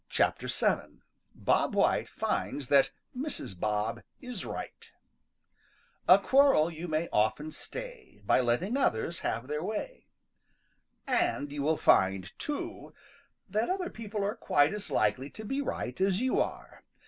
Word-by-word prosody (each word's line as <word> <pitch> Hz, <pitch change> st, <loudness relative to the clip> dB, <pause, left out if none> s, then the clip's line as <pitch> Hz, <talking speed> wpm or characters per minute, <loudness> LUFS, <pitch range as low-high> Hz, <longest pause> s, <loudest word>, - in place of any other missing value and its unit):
VII. -, -, 0 dB, 0.3 s
BOB -, -, +1 dB
WHITE -, -, +2 dB
FINDS 140 Hz, -4 st, -2 dB
THAT 140 Hz, -1 st, +5 dB, 0.3 s
MRS. 250 Hz, -, -4 dB
BOB 105 Hz, +2 st, -1 dB, 0.2 s
IS 250 Hz, -6 st, -6 dB
RIGHT -, -, -7 dB, 1.2 s
````A -, -, +8 dB
quarrel 265 Hz, -, +5 dB
you 165 Hz, +2 st, -6 dB
may 160 Hz, +1 st, 0 dB
often 110 Hz, +9 st, +1 dB
stay -, -, -8 dB
````By 130 Hz, -, +4 dB
letting 170 Hz, -, +1 dB
others 170 Hz, -, 0 dB
have 115 Hz, -, -2 dB
their 150 Hz, +1 st, -2 dB
way.= 220 Hz, -, -5 dB, 1.0 s
|AND 145 Hz, -, 0 dB
you 145 Hz, 0 st, -3 dB
will 155 Hz, +2 st, +2 dB
find, 95 Hz, 0 st, +3 dB
too, 295 Hz, -1 st, -5 dB, 0.5 s
that 215 Hz, +2 st, 0 dB
other 370 Hz, -1 st, -1 dB
people 215 Hz, -2 st, -4 dB
are 205 Hz, +1 st, 0 dB
quite 145 Hz, -7 st, +2 dB
as 210 Hz, -1 st, -5 dB
likely 110 Hz, +6 st, +1 dB
to 220 Hz, -, -9 dB
be 270 Hz, +6 st, -1 dB
right 125 Hz, -, -4 dB
as 190 Hz, 0 st, +2 dB
you 255 Hz, +1 st, +1 dB
are. -, -, -4 dB
170 Hz, 135 wpm, -30 LUFS, -, 1.2 s, ````A